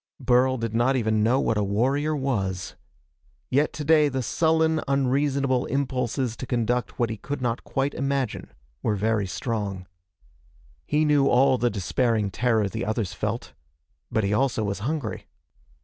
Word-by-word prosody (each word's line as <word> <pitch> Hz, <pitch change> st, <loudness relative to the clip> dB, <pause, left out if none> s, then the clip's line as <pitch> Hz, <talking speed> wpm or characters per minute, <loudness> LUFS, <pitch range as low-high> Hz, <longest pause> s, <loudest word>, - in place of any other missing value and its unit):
Burl 130 Hz, 0 st, +3 dB
did 115 Hz, -2 st, -3 dB
not 120 Hz, +4 st, +2 dB
even 110 Hz, -3 st, +1 dB
know 120 Hz, +5 st, +3 dB
what 110 Hz, -5 st, +1 dB
a -, -, +1 dB
warrior 135 Hz, +10 st, +1 dB
was. 100 Hz, -10 st, -2 dB, 0.8 s
Yet 145 Hz, +4 st, +2 dB
today 150 Hz, 0 st, +3 dB
the 130 Hz, -1 st, -2 dB
sullen, 160 Hz, +3 st, +2 dB
unreasonable 135 Hz, -1 st, +1 dB
impulses 130 Hz, -3 st, -1 dB
to 130 Hz, -, -6 dB
conduct 120 Hz, 0 st, -1 dB
what 120 Hz, -2 st, 0 dB
he 110 Hz, -, -4 dB
could 140 Hz, +8 st, -5 dB
not 120 Hz, -2 st, -2 dB
quite 135 Hz, +1 st, -1 dB
imagine 135 Hz, -3 st, -2 dB, 0.3 s
were 105 Hz, -, 0 dB
very 105 Hz, 0 st, 0 dB
strong. 100 Hz, -3 st, -3 dB, 1.0 s
He 150 Hz, +1 st, +2 dB
knew 145 Hz, -2 st, +4 dB
all 130 Hz, 0 st, +4 dB
the 120 Hz, -, +2 dB
despairing 105 Hz, +2 st, 0 dB
terror 110 Hz, -1 st, +1 dB
the 95 Hz, -, -4 dB
others 110 Hz, -2 st, -2 dB
felt. -, -, -4 dB, 0.6 s
But 110 Hz, -, +1 dB
he 100 Hz, +1 st, 0 dB
also 120 Hz, -1 st, +1 dB
was 100 Hz, -1 st, -2 dB
hungry. 130 Hz, 0 st, -3 dB
125 Hz, 150 wpm, -25 LUFS, 110-140 Hz, 1.0 s, knew